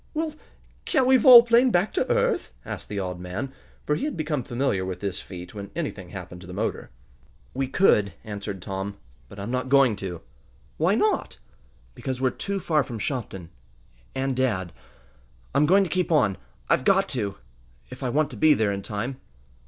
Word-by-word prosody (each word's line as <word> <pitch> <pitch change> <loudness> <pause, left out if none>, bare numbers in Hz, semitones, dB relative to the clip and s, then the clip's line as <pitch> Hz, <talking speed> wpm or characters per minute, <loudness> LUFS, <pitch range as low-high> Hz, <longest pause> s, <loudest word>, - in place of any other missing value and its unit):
"Well, 315 0 -1 0.5
can't 260 - +2
we 260 +1 +6
volplane 240 0 +8
back 190 -1 +1
to - - 0
earth?" - - +1
asked - - -6
the 105 - -4
odd 90 -2 -4
man, 100 +10 -5 0.3
for 150 - +1
he 260 - -1
had 300 - -3
become 150 -4 -1
familiar 120 -6 -1
with 95 -1 -4
this 100 -3 -3
feat 90 -1 -9
when 100 -2 -7
anything 105 - -4
happened 90 -2 -8
to 90 - -11
the 90 - -8
motor. 110 +3 -3 0.6
"We 135 +1 -1
could," 105 - +3
answered 100 -3 -6
Tom, 95 +1 -4 0.3
"but - - -12
I'm 100 +4 -4
not 130 0 -2
going 135 -5 +5
to." 90 -4 -6 0.6
"Why 175 +6 +3
not?" 425 - 0 0.6
"Because 130 -3 -4
we're 130 -1 +2
too 200 +8 -3
far 155 -5 +2
from 120 -3 -7
Shopton 100 - -4 0.6
and 135 0 -1
dad! 105 - 0 0.8
I'm 150 - +3
going 195 +4 +5
to - - -2
keep 180 -2 0
on. 110 - +3 0.3
I've - - +2
got 195 +5 +3
to 105 -7 -2 0.5
if - - -9
I 130 - -1
want 150 +4 +1
to - - -8
be 155 -1 +5
there 110 -2 +1
in 100 0 -3
time!" 115 +7 -4
125 Hz, 185 wpm, -25 LUFS, 100-155 Hz, 0.8 s, volplane